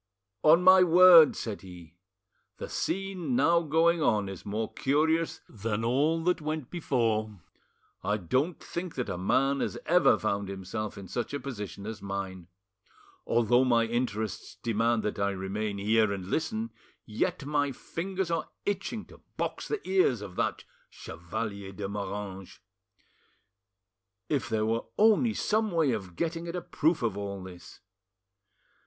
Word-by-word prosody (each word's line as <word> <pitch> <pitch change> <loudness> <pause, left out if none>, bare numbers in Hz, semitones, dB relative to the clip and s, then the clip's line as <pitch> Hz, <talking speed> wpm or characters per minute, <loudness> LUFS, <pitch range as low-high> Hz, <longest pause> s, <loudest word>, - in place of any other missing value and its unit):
"On 160 +6 +6
my 185 0 +8
word," 175 -2 +8
said 110 -3 -5
he, 90 -4 -12 0.6
"the - - -6
scene 195 +4 -2
now 170 -7 +4
going 165 +2 +2
on 105 -8 +2
is 95 -3 -8
more 110 +2 -3
curious 160 +4 +1
than 110 0 -3
all 150 +7 +2
that 180 -1 +1
went 155 -3 -4
before. 110 - -1 0.6
I 105 +1 +1
don't 130 - -1
think 170 -1 -6
that 125 -5 -3
a 95 - -3
man 135 +8 +2
has - - -2
ever 175 -9 +5
found 100 +1 -2
himself 100 +3 -5
in 100 -1 -8
such 120 +7 -3
a - - -2
position 105 -7 -7
as 110 -1 -6
mine. 95 -3 -5 0.8
Although 120 +2 +3
my 120 -3 +3
interests 115 -3 -3
demand 115 0 +1
that 105 - -3
I 100 0 +2
remain 100 +2 -3
here 110 +1 +2
and 95 -2 -4
listen, 220 +8 -1 0.3
yet 110 +5 -2
my 145 -1 0
fingers 180 +6 -4
are 165 - -1 0.2
itching 205 +2 -3
to - - -17 0.2
box - - -3
the 430 - -4
ears 180 - +2
of 95 -3 -9
that - - -1 0.3
Chevalier 100 +4 -6
de 100 0 -5
Moranges. 100 -1 -6 1.7
If 135 -8 -1
there 110 -1 0
were 115 +1 -1
only 220 +2 +4
some 215 0 +1
way 165 -7 +2
of 95 -6 -4
getting 165 - -2
at 170 - -4
a 180 - -2
proof 160 -3 0
of 110 -4 0
all 100 -1 -5
this! 90 -1 -12
115 Hz, 150 wpm, -29 LUFS, 100-165 Hz, 1.7 s, my